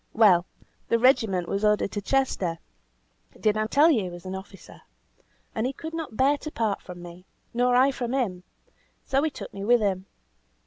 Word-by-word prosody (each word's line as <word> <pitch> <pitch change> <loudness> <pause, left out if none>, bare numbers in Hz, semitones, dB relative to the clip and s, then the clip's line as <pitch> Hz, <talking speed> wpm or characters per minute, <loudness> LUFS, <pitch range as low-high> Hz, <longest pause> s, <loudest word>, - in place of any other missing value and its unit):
Well, 190 -6 +5 0.4
the 230 - +4
regiment 225 -8 +3
was 200 +1 -2
ordered 210 -1 +2
to 205 - -3
Chester 200 -9 0 0.8
(did 215 -1 +2
I 215 0 0
tell 295 +8 +5
you 240 -8 +2
he 185 - -4
was 175 0 -10
an 185 - -5
officer?), 190 +1 -10 0.7
and 220 +3 -1
he 270 - -3
could 320 +3 -8
not 320 -9 -5
bear 280 +2 +3
to 305 - -6
part 220 -8 -1
from 175 -1 -10
me, 175 +1 -12 0.3
nor 245 +1 +2
I 260 +2 +5
from 255 -1 -3
him, 190 -9 -1 0.6
so 270 +1 +1
he 315 - +1
took - - -9
me 195 - -6
with 240 +3 +4
him. 195 -3 -1
215 Hz, 190 wpm, -26 LUFS, 190-260 Hz, 0.8 s, Well